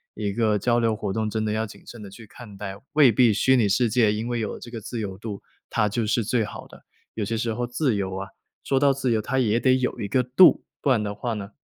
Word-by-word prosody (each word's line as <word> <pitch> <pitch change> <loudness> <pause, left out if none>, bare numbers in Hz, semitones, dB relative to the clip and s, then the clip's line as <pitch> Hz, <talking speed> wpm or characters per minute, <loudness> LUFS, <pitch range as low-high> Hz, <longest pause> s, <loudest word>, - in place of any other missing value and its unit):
一 105 -2 -3
个 110 -1 +1
交 120 +3 +2
流 115 -1 +2
活 105 -2 -3
动， 110 0 -1
真 110 0 -2
的 105 - -1
要 110 +1 -1
谨 105 - -13
慎 115 -3 -10
地 100 - -9
去 110 +2 -13
看 105 -3 -12
待。 95 -1 -6 0.2
未 145 -4 +6
必 115 +1 +4
虚 130 +5 +3
拟 115 -5 +2
世 115 +4 +2
界 110 -1 +3
因 110 +2 -3
为 120 0 -2
有 105 - -4
这 - - -10
个 115 -2 -7
自 115 +3 -6
由 95 -3 -5
度， 105 -1 -7 0.3
它 105 - +1
就 110 +2 -1
是 115 +1 0
最 115 +1 +1
好 105 - -8
的。 - - -16 0.3
有 110 - -3
些 115 +3 -2
时 115 0 -1
候 120 +2 -2
自 125 0 0
由 95 -2 -2
啊 95 +1 -5 0.4
说 135 - +1
到 140 -1 +5
自 135 -2 -1
由 110 - +1
它 135 +5 -1
也 115 -1 +1
得 130 -1 +4
有 125 -1 -2
一 100 - -4
个 130 +5 +2
度， 125 +9 +5 0.2
不 - - 0
然 125 -5 +3
的 105 -1 -4
话 120 +1 -3
呢， 100 0 -7
110 Hz, 300 characters per minute, -24 LUFS, 105-125 Hz, 0.4 s, 未